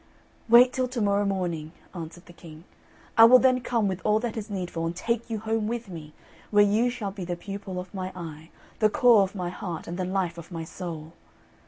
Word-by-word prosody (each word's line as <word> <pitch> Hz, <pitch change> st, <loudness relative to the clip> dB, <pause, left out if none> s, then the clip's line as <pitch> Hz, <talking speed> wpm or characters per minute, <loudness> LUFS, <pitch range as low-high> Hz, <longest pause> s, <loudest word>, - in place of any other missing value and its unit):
"Wait 245 Hz, +2 st, +7 dB
till 255 Hz, -1 st, 0 dB
to 250 Hz, -1 st, -5 dB
morrow 205 Hz, -1 st, +2 dB
morning," 175 Hz, -5 st, -2 dB, 0.2 s
answered 170 Hz, 0 st, -8 dB
the 175 Hz, -, -14 dB
King; 160 Hz, -2 st, -13 dB, 0.6 s
"I 225 Hz, -, +11 dB
will 250 Hz, +2 st, +9 dB
then 255 Hz, 0 st, +3 dB
come 230 Hz, -3 st, 0 dB
with 190 Hz, -1 st, -3 dB
all 215 Hz, 0 st, +3 dB
that 240 Hz, -2 st, -3 dB
is 220 Hz, -1 st, -5 dB
needful, 175 Hz, -4 st, -3 dB
and 170 Hz, -, -4 dB
take 235 Hz, +4 st, -2 dB
you 225 Hz, -, -2 dB
home 220 Hz, 0 st, -1 dB
with 235 Hz, -2 st, -4 dB
me, 155 Hz, -4 st, -9 dB, 0.4 s
where 205 Hz, -1 st, +5 dB
you 220 Hz, +4 st, +2 dB
shall 230 Hz, -5 st, -4 dB
be 195 Hz, -1 st, -7 dB
the 175 Hz, 0 st, -3 dB
pupil 195 Hz, 0 st, -6 dB
of 180 Hz, +1 st, -9 dB
my 185 Hz, -1 st, -4 dB
eye, 160 Hz, -2 st, -8 dB, 0.3 s
the 215 Hz, -2 st, +4 dB
core 235 Hz, -1 st, +5 dB
of 195 Hz, +1 st, -1 dB
my 180 Hz, -2 st, -3 dB
heart, 175 Hz, -2 st, -6 dB
and 175 Hz, +2 st, -6 dB
the -, -, 0 dB
life 180 Hz, -2 st, -2 dB
of 170 Hz, +2 st, -12 dB
my 165 Hz, -2 st, -5 dB
soul." 165 Hz, -2 st, -7 dB
195 Hz, 220 wpm, -26 LUFS, 175-225 Hz, 0.6 s, I